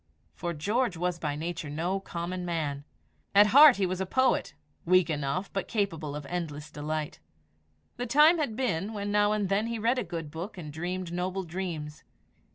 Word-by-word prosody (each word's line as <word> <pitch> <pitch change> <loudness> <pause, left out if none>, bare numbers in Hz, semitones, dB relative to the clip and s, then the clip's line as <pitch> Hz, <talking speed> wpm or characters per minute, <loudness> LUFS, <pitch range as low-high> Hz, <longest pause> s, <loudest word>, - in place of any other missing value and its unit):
For 175 - -4
George 210 - 0
was 175 0 -1
by 150 -3 -2
nature 165 0 -4
no 170 +6 -1
common 180 -1 -5
man. 150 -5 -3 0.5
At 205 +1 +9
heart 290 -1 +10
he 195 - +1
was 185 +1 -2
a 190 - -2
poet 260 +6 +1 0.3
weak 180 -1 +4
enough, 145 +5 -2
but 195 - -2
capable 165 -9 -2
of 150 -1 -6
endless 155 -2 -5
delight. 150 +1 -4 0.8
The 245 +1 -3
time 300 +7 +6
had 260 -8 -1
been 215 -5 -1
when 205 -1 -3
now 205 0 +3
and 210 -2 0
then 200 +4 +1
he 230 0 -3
read 235 +4 +1
a - - -1
good 165 -4 -6
book 170 +6 -6
and 150 -4 -7
dreamed 175 +2 -4
noble 185 +2 -2
dreams. 165 -4 -5
180 Hz, 180 wpm, -28 LUFS, 160-205 Hz, 0.8 s, heart